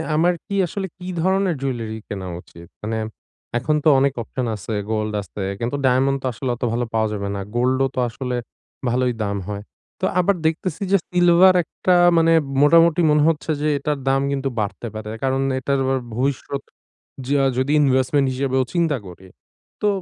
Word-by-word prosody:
আমার 170 +3 +3
কী 200 - -3
আসলে 190 +3 -4
কী 180 -1 -9
ধরনের 190 -1 +2
জুইয়েলারি 115 -5 -3
কেনা 95 -2 -5
উচিত? 85 -1 -15 0.2
মানে 110 +1 -2 0.6
এখন 140 +6 0
তো 160 - +5
অনেক 140 0 +2
অপশন 125 +2 -4
আছে, 105 +2 -6 0.2
গোল্ড 110 -1 -1
আছে 100 +1 -8 0.2
কিন্তু 120 +4 -2
ডায়মন্ড 135 +2 +3
তো - - -4
আসলে 125 +3 -4
অত - - -9
ভালো 120 +1 0
পাওয়া 110 -1 +2
যাবে 100 -1 -3
না। - - -3 0.2
গোল্ডও 130 +2 +2
তো - - -1
আসলে 125 +2 -4 0.5
ভালোই 125 +1 +1
দাম 100 0 -2
হয়। 100 0 -5 0.4
তো 185 - +2
আবার 185 +2 +3
দেখতেছি 165 +3 -1
যে, 200 - +6
সিলভার 180 +1 +5
একটা 180 +3 0 0.2
মানে 165 0 +4 0.3
মোটামুটি 165 +2 +5
মনে 150 0 +4
হচ্ছে 160 0 -1
যে 155 - +1
এটার 145 0 -2
দাম 135 0 +2
কিন্তু 135 -1 -1
বাড়তে 105 +3 -3
পারে। 110 0 -6
কারণ 135 0 +1 0.2
এটার 140 +2 0
আবার 135 0 +1 0.2
ভবিষ্যৎ 140 +2 -2 0.7
যা 140 -1 +3
যদি 130 +2 +1
ইনভেস্টমেন্ট 135 0 +2
হিসেবেও 130 0 0
চিন্তা 165 -5 +1
করি। 90 +1 -12 0.5
তো 210 - +2
135 Hz, 175 wpm, -21 LUFS, 120-160 Hz, 0.7 s, যে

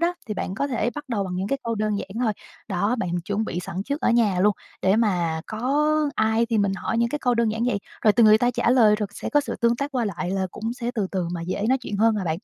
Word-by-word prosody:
đó 345 +1 +1
thì 210 - -3
bạn 190 -1 -3
có 280 - -1
thể 240 -3 -1
bắt 295 -1 -6
đầu 215 -5 -1
bằng 180 -1 -4
những 190 +2 -2
cái 275 - 0
câu 230 0 -1
đơn 215 -1 -1
giản 195 - -6 0.2
thôi. 220 - +2 0.4
Đó, 200 +4 0
bạn 185 -5 -2
chuẩn 205 +3 -1
bị 175 - -3
sẵn 180 +1 -5
trước 285 +7 -3
ở - - +2
nhà 215 -6 +3
luôn 210 +2 +4 0.3
để 190 +2 +3
mà 175 -8 +1
có 280 +8 +1 0.2
ai 220 +1 +2
thì 230 -2 0
mình 200 -1 +2
hỏi 220 +4 -2
những 235 0 +2
cái 295 - -3
câu 245 -4 +1
đơn 235 -1 +2
giản 225 +2 -1
vậy, 245 -5 +1 0.2
rồi 215 - +5
từ 235 +2 +4
người 215 0 +7
ta 245 +2 +2
trả 240 - +1
lời 225 -5 +5
rồi 210 -1 -2
sẽ - - -5
có 295 - +4
sự 290 - -5
tương 235 0 +2
tác 280 +3 -3
qua 250 -3 0
lại 180 -3 -3
là 190 0 0
cũng 225 +5 -4
sẽ 240 -1 -3
từ 210 -4 0
từ 185 -3 -1
mà 170 -1 -4
dễ 185 +4 -3
nói 260 +1 +3
chuyện 210 -5 -5
hơn 225 +2 +3
mà 205 -3 -2
bạn. 160 - 0
220 Hz, 300 wpm, -24 LUFS, 195-240 Hz, 0.4 s, người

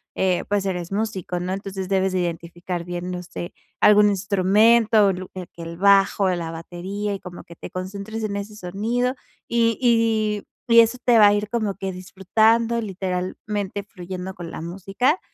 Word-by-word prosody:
eh, 185 -2 +1
pues 205 -1 +1
eres 180 -2 -3
músico, 195 -4 -2
¿no?, 180 +1 -3
entonces, 195 -1 -5
debes 190 0 +1
de 185 - 0
identificar 175 0 -4
bien, 175 +1 -5
no 180 0 -4
sé, 175 0 -7 0.3
algún 210 0 +6
instrumento, 205 +2 +4
lu 185 0 -7
eh, 185 -2 -7
que 170 - -11
el 165 0 -7
bajo, 195 +1 +4
la 165 -2 -4
batería 185 +5 -5
y 195 - -6
como 180 -1 -10
que 170 - -13
te - - -9
concentres 200 +4 -6
en 200 -1 -3
ese 205 +1 -6
sonido 225 +7 -1 0.3
y 230 -1 +2
y 225 -4 +2 0.2
y 230 -1 +7
eso 230 +2 +1
te 240 -2 +5
va 210 - +9
a 205 - +5
ir 205 0 -1
como 220 -4 -1
que 195 -1 -4
disfrutando 220 +6 +1
literalmente 195 +1 -3
fluyendo 185 -1 -7
con 175 -2 -8
la - - -6
música 195 - 0
195 Hz, 175 wpm, -23 LUFS, 180-215 Hz, 0.3 s, va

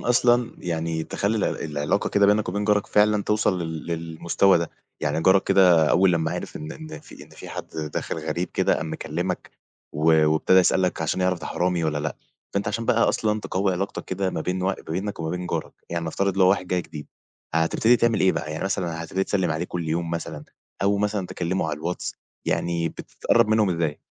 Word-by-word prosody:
أصلًا 120 0 +3
يعني 80 -2 -2
تِخلّي 100 +6 -1
ال - - -5
العلاقة 75 +6 0
كده 100 0 +4
بينك 105 0 +3
وبين 100 +3 -1
جارك 105 -1 +2
فعلًا 105 0 +3
تِوصَل 100 -4 +1
ل 80 -1 -5
للمستوى 85 +3 +2
ده، 85 - -3 0.3
يعني 75 +3 0
جارك 95 +2 +5
كده 90 -5 +5
أول 90 0 +4
لمّا 80 -1 0
عِرِف 90 - -5
إن 75 +1 -6
إن 155 0 -9
في - - -13
إن - - -22
في - - -11
حد - - -6 0.3
داخل - - -3
غريب 90 +1 -2
كده - - +2
قام 80 -1 -4
مِكَلِّمك 85 +4 -3 0.4
و-وابتدى 80 +3 +4
يسألك 90 -2 +2
عشان 80 +3 -1
يِعرف 90 -1 +1
ده - - -5
حرامي 90 -2 0
والّا 75 -1 0
لأ، 75 +2 -3 0.4
فأنت 100 +1 0
عشان 115 +2 -2
بقى 115 - +3
أصلًا 105 -1 0
تقوّي 95 0 0
علاقتك 95 +3 -3
كده 95 0 -2
ما 80 - -3
بين 90 +2 -2
و - - 0
ما 95 - +1
بينك 95 +4 -3
وما 80 -1 -2
بين 90 0 -3
جارك، - - -3 0.2
يعني 85 -1 -2
نفترض 95 +4 -1
لو 95 -1 +6
واحد 95 -1 +2
جاي 90 -1 0
جديد، 75 -3 -9 0.5
هتبتدي 85 +9 +3
تعمل 115 -2 +2
إيه 95 - +4
بقى؟ 75 - -4
يعني 80 - -4
مثلًا 85 -4 -2
هتبتدي 95 +3 -1
تِسَلِّم 95 -4 0
عليه 80 +2 -1
كل 85 -2 -4
يوم 85 +1 -1
مثلًا 80 -3 -5 0.4
أو 100 +1 +3
مثلًا 105 -2 -1
تِكَلِّمه 90 +2 -2
على - - -2
الواتس؟ 85 +4 -4 0.3
يعني 85 -1 0
بتتقرّب 100 - 0
منهم 110 -2 +3
إزاي؟ 80 -4 -1
90 Hz, 200 wpm, -24 LUFS, 80-100 Hz, 0.5 s, لو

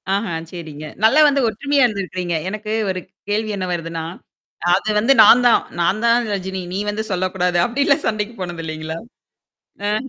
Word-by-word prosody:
ஆஹா, 200 -3 -2 0.2
சரிங்க. 155 -4 -8 0.2
நல்லா 270 +8 +6
வந்து 280 -1 +2
ஒற்றுமையா 280 +6 +1
இருந்திருக்கிறீங்க. 185 -5 -2
எனக்கு 215 +1 -5 0.2
ஒரு 185 -1 -2 0.3
கேள்வி 215 +1 0
என்ன 185 - -2
வருதுன்னா? 165 -1 -4 0.7
அது 205 +3 -2
வந்து 255 +6 +4
நான் 245 +4 +7
தான். 235 - +5 0.2
நான் 195 +5 +1
தான் 235 +1 +4
ரஜினி. 190 -1 -4
நீ 195 - -2
வந்து 215 +1 -2
சொல்லக்கூடாது. 180 -1 0
அப்டிலாம் 280 +4 +1
சண்டைக்கு 215 +1 -2
போனது 175 -2 -5
இலைங்களா? 155 +1 -5 0.9
ஆஹ்ம். 215 +6 -1
200 Hz, 155 wpm, -20 LUFS, 175-230 Hz, 0.9 s, நான்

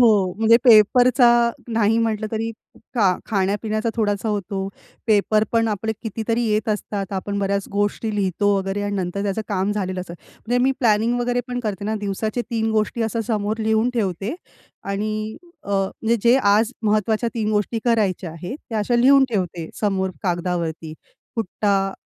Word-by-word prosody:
हो, 240 - +7 0.3
म्हणजे 225 +1 +6
पेपरचा 245 +2 +6 0.4
नाही 225 0 +2
म्हंटलं 220 -1 0
तरी 225 0 -2 0.4
खा 230 -4 +2 0.2
खाण्यापिण्याचा 215 +2 -1
थोडासा 210 -1 0
होतो, 195 -2 -2 0.4
पेपर 215 0 +3
पण 230 -1 +2
आपले 220 +1 -2
कितीतरी 225 +1 -2
येत 215 -1 0
असतात, 205 -2 -3
आपण 200 +1 -3
बऱ्याच 200 0 -1
गोष्टी 205 +2 -1
लिहितो 200 0 0
वगैरे 195 +1 -2
आणि 205 0 -2
नंतर 185 +1 -2
त्याचं 205 +2 -1
काम 200 0 0
झालेलं 185 -3 -2
असतं. 175 -2 -8 0.3
म्हणजे 245 +2 +1
मी 270 - +3
प्लॅनिंग 230 0 +2
वगैरे 245 0 0
पण 245 0 -3
करते 205 -4 -4
ना 215 +1 -1
दिवसाचे 215 +4 -2
3 225 -1 0
गोष्टी 220 +2 0
अशा 225 +1 -1
समोर 215 -1 -1
लिहून 220 +2 +1
ठेवते 200 - -1 0.5
आणि 215 +2 -3 0.3
अ, - - -13
म्हणजे 200 +4 0
जे 240 +2 +5
आज 215 -1 +3
महत्वाच्या 215 +2 +1
3 220 -2 -1
गोष्टी 210 +2 0
करायच्या 205 -7 +1
आहेत 175 - -7
त्या 225 - -2
अशा 225 +3 +1
लिहून 270 +3 +6
ठेवते 180 -6 -2
समोर 190 -3 0
कागदावरती. 170 -3 -2 0.4
फुट्टा 195 -2 0
215 Hz, 160 wpm, -22 LUFS, 195-225 Hz, 0.5 s, हो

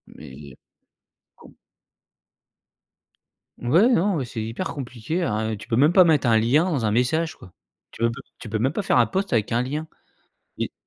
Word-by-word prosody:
Mais 70 0 -12 0.8
com - - -17 2.1
Ouais, 165 - +3
non, 200 -5 +2
ouais, 135 - -2
c'est 115 -2 -6
hyper 115 +11 -4
compliqué, 135 +5 -4
hein. 110 -4 -1
Tu 105 - -12
peux 120 - 0
même 150 +5 +5
pas 185 - +7
mettre 155 -6 +2
un 115 - +4
lien 125 +9 +3
dans 145 -11 -1
un 105 - +1
message, 155 +8 0
quoi. 95 - -15 0.4
Tu - - -7
on 115 - +3
peut 130 +4 -9 0.2
tu 110 - -10
peux 110 - -2
même 130 +5 +1
pas 205 - -3
faire 160 - +2
un 115 - +4
post 190 - -2
avec 110 -3 0
un 120 +2 +1
lien. 150 +5 -4 0.7
Les - - -4
125 Hz, 190 wpm, -23 LUFS, 115-160 Hz, 2.1 s, pas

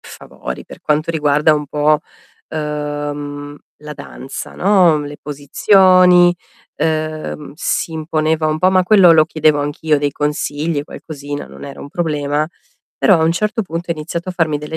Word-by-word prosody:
favori - - -9
per - - -13
quanto 155 +2 0
riguarda 150 0 +3
un 150 -1 -3
po', 150 +1 +2 0.5
uhm, 145 -1 -4 0.3
la 150 0 -7
danza, 135 0 -8
no, 180 -5 +4
le 145 0 -7
posizioni, 180 +4 +4 0.4
uhm, 155 -2 -3
si 165 0 -2
imponeva 155 0 0
un 155 0 0
po', 185 +3 +3
ma 185 -1 +4
quello 180 -3 +6
lo 155 -1 +5
chiedevo 155 -2 +2
anch'io, 150 +1 0
dei 145 0 0
consigli, 150 +1 -2
qualcosina, 145 -2 -7
non - - -11
era 140 -1 -9
un 140 - -9
problema, 150 -2 -1 0.5
però 185 -6 +4
a - - +2
un 165 - +3
certo 215 +5 -1
punto 170 -1 -5
ha - - +1
iniziato 165 +3 -5
a - - -2
farmi 160 -4 0
delle 150 +2 -6
155 Hz, 160 wpm, -17 LUFS, 145-170 Hz, 0.5 s, quello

